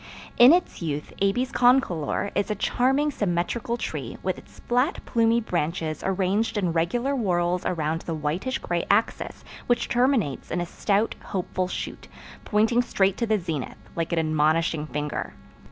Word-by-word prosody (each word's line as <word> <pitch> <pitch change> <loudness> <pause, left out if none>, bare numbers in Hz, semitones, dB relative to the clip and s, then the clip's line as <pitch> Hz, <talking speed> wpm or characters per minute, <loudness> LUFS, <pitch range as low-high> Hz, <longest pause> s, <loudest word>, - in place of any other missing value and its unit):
In 245 +3 +10
its 350 - +1
youth 150 -3 -3
A. 200 0 +4
concolor 245 - +2
is 200 - 0
a 210 - 0
charmingly 270 +8 +1
symmetrical 205 +3 -1
tree - - -5
with - - -1
its - - -18
flat 250 +7 +1
plumy 230 -1 +3
branches 165 -6 -2
arranged 195 +4 0
in 180 -5 0
regular 235 +12 0
whorls 180 -6 0
around 160 -1 -1
the 165 - -4
whitish 160 - -2
gray - - -2
axis - - 0 0.2
which 240 - +1
terminates 240 - +1
in 175 - -1
a 175 - -1
stout, 205 +5 0
hopeful 185 -1 -2
shoot, - - -6 0.4
pointing 225 +3 +3
straight 195 -5 +1
to 235 - -1
the 215 0 +3
zenith, 165 -7 -4 0.2
like 165 0 -2
an 170 - 0
admonishing 155 0 +1
finger. 150 -1 -4
195 Hz, 155 wpm, -25 LUFS, 165-235 Hz, 0.4 s, In